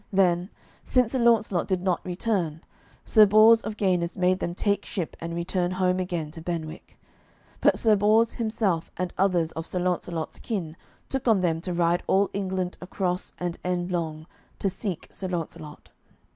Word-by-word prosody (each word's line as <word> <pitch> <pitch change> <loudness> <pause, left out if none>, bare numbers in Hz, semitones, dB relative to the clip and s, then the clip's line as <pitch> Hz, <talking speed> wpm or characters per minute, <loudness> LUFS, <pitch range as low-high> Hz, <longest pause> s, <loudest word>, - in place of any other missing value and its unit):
Then, 180 -2 +2 0.3
since 250 -3 +2
Sir 260 - 0
Launcelot 225 -6 +3
did 185 -2 -1
not 185 -2 0
return, 180 -4 -2 0.4
Sir 215 -2 +6
Bors 220 +3 +7
of 215 - -6
Ganis 180 -4 0
made 185 0 +2
them 175 - -3
take 200 0 0
ship 180 -6 -4
and 170 0 -5
return 175 +1 -1
home 185 0 +1
again 175 -4 -3
to 165 0 -9
Benwick. 165 -2 -6 0.6
But - - +4
Sir 220 -2 +4
Bors 215 +3 +3
himself 215 -7 -1
and 180 0 -3
others 180 -4 +2
of 160 +1 -5
Sir - - -3
Launcelot's 175 -2 -2
kin 175 -9 -4 0.3
took 270 -2 -3
on 215 -5 +4
them 165 -2 0
to 180 - -4
ride 170 0 +2
all 195 +1 +3
England 190 -2 -2
across 180 0 -2
and 175 -1 -4
endlong, 175 -3 -2 0.3
to 195 - 0
seek 190 -2 -5
Sir 190 - -4
Launcelot. 165 -3 -6
180 Hz, 165 wpm, -26 LUFS, 170-200 Hz, 0.6 s, Bors